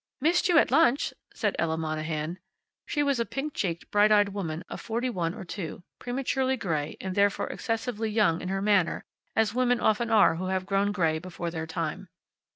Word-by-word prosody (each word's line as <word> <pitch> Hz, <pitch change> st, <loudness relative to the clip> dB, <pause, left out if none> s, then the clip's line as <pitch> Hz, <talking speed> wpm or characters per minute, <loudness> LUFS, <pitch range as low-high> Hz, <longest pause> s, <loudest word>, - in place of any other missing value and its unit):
"Missed 335 Hz, +6 st, +2 dB
you 345 Hz, -, +5 dB
at -, -, +4 dB
lunch," 275 Hz, -4 st, +3 dB, 0.2 s
said -, -, -1 dB
Ella 160 Hz, -1 st, 0 dB
Monahan. 155 Hz, +1 st, -3 dB, 0.5 s
She 295 Hz, -, 0 dB
was 280 Hz, -3 st, +1 dB
a -, -, +3 dB
pink 285 Hz, +2 st, -4 dB
cheeked, 170 Hz, -3 st, -3 dB
bright 210 Hz, +1 st, +5 dB
eyed 205 Hz, -1 st, +5 dB
woman 180 Hz, -4 st, -4 dB
of -, -, -7 dB
forty 235 Hz, +2 st, -2 dB
one 170 Hz, -5 st, -2 dB
or -, -, -7 dB
two, 175 Hz, -1 st, -6 dB, 0.2 s
prematurely 265 Hz, +1 st, -1 dB
gray 155 Hz, -9 st, -2 dB
and 190 Hz, -1 st, -4 dB
therefore 200 Hz, +1 st, +2 dB
excessively 225 Hz, -1 st, -2 dB
young 210 Hz, -6 st, +2 dB
in 180 Hz, -, -4 dB
her 195 Hz, 0 st, -1 dB
manner, 200 Hz, -5 st, +2 dB, 0.3 s
as 220 Hz, -1 st, +2 dB
women 245 Hz, -1 st, +2 dB
often 220 Hz, +2 st, +2 dB
are 210 Hz, -7 st, +5 dB
who 185 Hz, +2 st, -3 dB
have 185 Hz, 0 st, -1 dB
grown 195 Hz, +1 st, +1 dB
gray 165 Hz, -6 st, +1 dB
before 175 Hz, 0 st, -5 dB
their 160 Hz, -1 st, -4 dB
time. 160 Hz, -1 st, -4 dB
200 Hz, 190 wpm, -28 LUFS, 170-235 Hz, 0.5 s, you